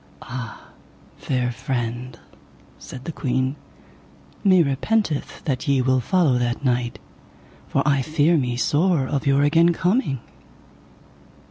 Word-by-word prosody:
Ah, 125 -3 -8 0.5
fair 125 -2 -1
friend, 120 0 -4 0.6
said 130 0 -10
the 165 - -3
queen, 130 -2 -1 0.9
me 185 -4 +5
repenteth 155 +4 -1
that 135 -1 -2
ye 140 -1 +3
will 130 0 +2
follow 140 -1 +2
that 120 +3 -2
knight, 120 -1 0 0.7
for 140 - 0
I 140 -2 +3
fear 155 +4 +2
me 125 -5 0
sore 150 +2 +2
of 140 +1 -2
your 140 +1 +4
again 165 +4 +4
coming. 175 - 0
135 Hz, 120 wpm, -22 LUFS, 125-155 Hz, 0.9 s, me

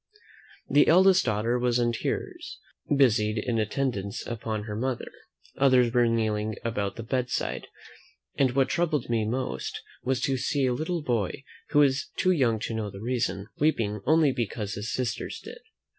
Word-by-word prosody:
The 145 +2 +4
eldest 185 +2 +6
daughter 115 +2 0
was 120 -1 +2
in 120 -1 +2
tears, 115 - -4 0.4
busied 110 -5 +3
in 115 +1 -1
attendance 110 -3 -2
upon 110 -2 -4
her 105 -1 -5
mother; 125 +2 -3 0.5
others 130 -3 +4
were 120 -1 +4
kneeling 110 -2 0
about 100 -4 -2
the 115 - -6
bedside: 125 +2 -2 0.7
and 130 -3 +2
what 135 -1 +3
troubled 155 -8 0
me 115 -2 +1
most, 125 +3 -3 0.2
was, 130 0 0
to 135 -1 +1
see 135 +2 0
a 125 - +2
little 160 +4 -2
boy, 120 -1 -1 0.3
who 145 - 0
was 140 -2 +3
too 185 - +3
young 125 -10 +2
to 115 - -3
know 110 -2 -2
the 100 0 -10
reason, 115 -4 -1
weeping 110 -9 +1
only 155 -1 +5
because 110 -4 -3
his 105 +4 -4
sisters 125 -2 -3
did. - - -10
120 Hz, 160 wpm, -27 LUFS, 110-135 Hz, 0.7 s, eldest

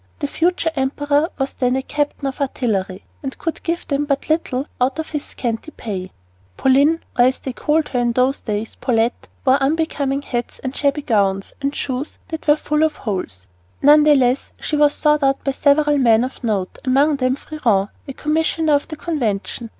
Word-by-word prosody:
The - - -3
future 335 +1 0
emperor 290 +3 +1
was 270 -1 -2
then 250 0 +1
a 265 - -1
captain 290 0 -2
of 275 +1 -3
artillery 205 -8 -1 0.2
and 270 -2 -5
could 330 - -4
give 340 0 -3
them 285 0 0
but 280 0 -2
little 290 -4 0 0.2
out 260 +3 +2
of 320 - -4
his 295 -2 -2
scanty 235 +2 -4
pay. 190 -10 -6 0.5
Pauline 280 +5 +4 0.2
or, 245 - +7
as 255 +1 +2
they 260 - -6
called 305 +4 0
her 250 - -1
in 240 -1 +1
those 255 +3 +1
days, 215 0 -3
Paulette 230 -1 0 0.2
wore 265 +1 +4
unbecoming 285 -2 0
hats 240 -3 -4
and 260 0 -4
shabby 285 0 0
gowns, 195 -5 +1
and 280 +1 -1
shoes 265 +2 -3
that 320 -1 -6
were 295 - +6
full 300 0 -1
of 315 -1 +2
holes. 180 - -4 0.4
None 295 +2 +8
the 300 0 +6
less, 255 -1 +1
she 305 - -2
was 295 -1 +4
sought 300 -1 +2
out 270 0 +1
by 275 - 0
several 290 +1 +3
men 230 -3 +4
of 255 0 -6
note, 200 -5 -2
among 280 +3 +3
them 255 -1 +1
Freron, 230 -10 0 0.2
a 275 - -5
commissioner 315 +1 +1
of 285 - +1
the 310 - -6
Convention. 235 - -3
275 Hz, 190 wpm, -20 LUFS, 245-300 Hz, 0.5 s, None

